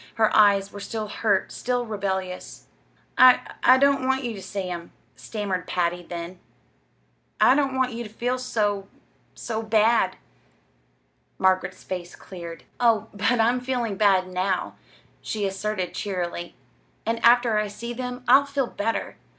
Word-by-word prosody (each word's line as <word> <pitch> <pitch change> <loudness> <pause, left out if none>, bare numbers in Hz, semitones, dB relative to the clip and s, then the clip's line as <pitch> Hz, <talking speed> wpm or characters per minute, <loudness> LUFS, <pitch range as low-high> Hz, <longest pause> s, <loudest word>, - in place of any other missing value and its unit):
Her 220 -1 +2
eyes 200 -2 +5
were 205 - -8
still 215 +1 -5
hurt, 205 -2 0
still 245 0 -2
rebellious. 190 -4 -4 0.5
"I 255 -1 +8 0.2
I 255 - +7
don't 275 -1 +3
want 265 0 +1
you 240 -2 -3
ter 200 - -8
see 195 +1 -4
them," 175 -2 -6 0.2
stammered 200 -4 -4
Patty, 175 0 -1
then. 175 +1 -7 1.0
"I 215 +4 +6
don't 275 -1 +1
want 260 -1 0
you 235 +1 -4
ter 215 - -9
feel 245 +4 -2
so 205 -5 -1 0.5
so 225 -1 -4
bad." 220 -3 +2 1.2
Margaret's 185 0 +1
face 180 -2 -6
cleared. 170 -3 -9 0.2
"Oh, 225 -2 +2
but 210 +4 +1
I'm 235 +3 +3
feeling 245 -4 -2
bad 190 -2 +3
now," 185 0 -1 0.5
she 210 -2 -3
asserted 195 -1 -3
cheerily; 175 -3 -4 0.5
"and 230 +1 -2
after 235 -2 +5
I 210 - -1
see 235 +4 -6
them 250 0 -5
I'll 270 +3 +6
feel 280 -1 -1
better. 225 -1 -3
215 Hz, 145 wpm, -24 LUFS, 190-245 Hz, 1.2 s, I